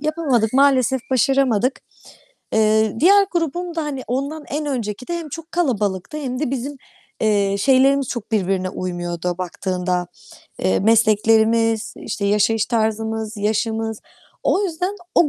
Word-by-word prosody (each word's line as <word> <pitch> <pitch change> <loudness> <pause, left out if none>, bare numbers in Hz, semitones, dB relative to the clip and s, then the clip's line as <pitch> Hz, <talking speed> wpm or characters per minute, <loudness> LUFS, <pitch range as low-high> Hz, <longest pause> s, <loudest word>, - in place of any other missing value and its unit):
yapamadık, 295 -8 0
maalesef 265 -1 +3
başaramadık. 260 -2 +2 0.7
Eee, 220 0 +2
diğer 395 +5 +6
grubum 345 +1 -2
da, 325 - -1
hani, 275 -3 -4
ondan 280 +5 -3
en 300 +1 -3
önceki 245 -4 -4
de 345 0 -2
hem 325 -2 -7
çok 330 +3 -9
kalabalıktı 215 - -1
hem 255 -4 -4
de 300 - -1
bizim, 275 +2 -4 0.4
eee, 200 -2 +2
şeylerimiz 270 +3 +3
çok 235 -2 -6
birbirine 190 -3 0
uymuyordu 175 -1 -3
baktığında. 180 0 -2 0.5
Eee, 95 0 +1
mesleklerimiz, 225 +1 +3
işte, 200 - -4
yaşayış 210 +2 +2
tarzımız, 220 -1 -1
yaşımız...O 220 - -2
yüzden 360 +2 -2 0.2
o 320 - +5
230 Hz, 125 wpm, -20 LUFS, 210-280 Hz, 0.7 s, diğer